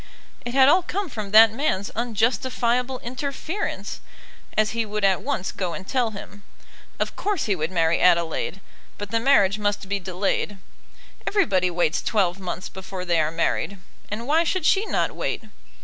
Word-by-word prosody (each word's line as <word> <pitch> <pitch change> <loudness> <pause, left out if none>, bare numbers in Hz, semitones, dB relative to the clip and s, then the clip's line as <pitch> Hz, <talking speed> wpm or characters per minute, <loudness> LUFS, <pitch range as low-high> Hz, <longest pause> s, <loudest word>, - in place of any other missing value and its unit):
It 240 +1 -5
had 265 -1 +7
all 350 +6 +6
come 375 +1 -3
from 215 -6 -5
that 220 +1 +8
man's 220 -7 -1
unjustifiable 245 +2 0
interference, 280 - -4 0.6
as 215 0 +3
he 230 0 0
would 210 -1 -1
at 190 -2 +3
once 235 -9 -2
go 180 -3 -3
and 190 - -8
tell 250 -3 +1
him. 205 -1 -10 0.6
Of - - -2
course 410 -4 -1
he 205 - +1
would 155 -2 -2
marry 165 -2 +2
Adelaide, 170 +1 +2 0.4
but 205 0 -6
the 230 - +2
marriage 215 -6 +4
must 205 -1 -1
be 200 +1 -1
delayed. 190 +2 -2 0.7
Everybody 190 - +2
waits 175 -2 0
twelve 195 -4 +1
months 180 -1 -5
before 190 -1 -7
they 170 -2 +2
are 155 - +1
married; 165 +3 -1 0.3
and 215 +3 -4
why 310 +5 +3
should 360 -1 -1
she 400 +6 +3
not - - 0
wait? - - -3
210 Hz, 165 wpm, -24 LUFS, 185-255 Hz, 0.7 s, that